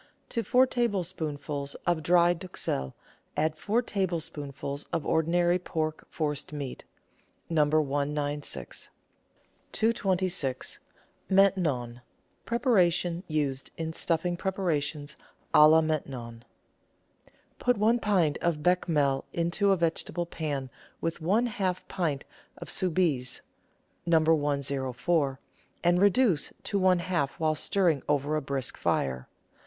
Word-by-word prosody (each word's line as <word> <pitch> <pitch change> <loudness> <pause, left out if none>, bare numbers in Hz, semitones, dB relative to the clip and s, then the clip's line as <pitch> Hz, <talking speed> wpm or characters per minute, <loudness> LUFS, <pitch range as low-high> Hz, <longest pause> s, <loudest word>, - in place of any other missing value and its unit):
To 230 - -1
four 250 +3 +4
tablespoonfuls 165 - -2
of 175 -2 +1
dry 175 +2 +4
duxelle 165 - -4 0.4
add 155 +1 +1
four 215 +9 0
tablespoon 165 - -3
fuls 140 +1 -5
of 165 -3 -1
ordinary 175 +2 +2
pork 155 -3 -3
forcemeat 150 -3 -4 0.7
(No. 155 -2 +4
196). 145 -1 -1 0.8
226 185 - 0 0.2
— - - -38
MAINTENON 145 -12 +2 0.4
(preparation 180 - +2
used 145 -4 -1
in 160 -1 -3
stuffing 170 +2 0
preparations 160 -6 -2 0.4
k - - +7
la 155 +1 +8
Maintenon) 130 -7 -4 1.1
Put 245 -2 +2
one 225 +4 +3
pint 180 -9 +2
of 160 -3 -1
Bechamel 150 -6 +2
into 170 +4 +1
a 195 - +4
vegetable 170 +1 -1
pan 145 -6 -4 0.3
with 165 0 -3
one 205 +9 +2
half 190 -6 -2
pint 155 -7 -2 0.3
of - - -7
Soubise 160 -8 0 0.7
(No. 165 -1 +5
104), 140 -2 +1 0.4
and 175 +1 +3
reduce 200 - +3
to 200 -2 -1
half 175 -5 +1
while 155 -1 +2
stirring 165 -2 +1
over 145 +1 +1
a 155 - 0
brisk 135 -2 -2
fire. 65 -1 -1
160 Hz, 110 wpm, -28 LUFS, 145-180 Hz, 1.1 s, la